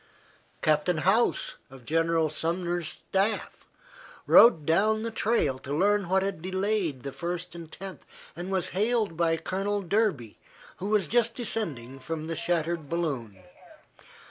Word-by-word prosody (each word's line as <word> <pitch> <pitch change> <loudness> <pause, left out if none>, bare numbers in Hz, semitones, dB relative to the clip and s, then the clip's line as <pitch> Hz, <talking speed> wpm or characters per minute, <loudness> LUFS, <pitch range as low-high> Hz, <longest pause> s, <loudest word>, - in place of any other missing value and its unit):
Captain 155 +3 +2
Howse, 195 +9 +1
of 130 -2 -14
General 165 0 +2
Sumner's 170 +1 -1
staff, 200 +6 -2 0.6
rode 195 -11 +7
down 215 +7 +2
the 230 - -3
trail 210 - 0
to 140 +2 -4
learn 200 0 +2
what 190 +1 +3
had 195 -4 -3
delayed 190 - -1
the 140 - -5
First 175 +3 -4
and 165 -2 -10
Tenth, 195 -1 -9 0.3
and 175 +3 -6
was 190 -2 0
hailed 215 -1 0
by 165 -1 +1
Colonel 195 +4 -2
Derby, 185 - 0 0.4
who 195 - -4
was 210 -3 +2
just 230 +5 +2
descending 140 - -2
from 155 +3 -5
the 165 0 -3
shattered 170 -2 -1
balloon. 130 - -3
175 Hz, 140 wpm, -27 LUFS, 155-200 Hz, 0.6 s, rode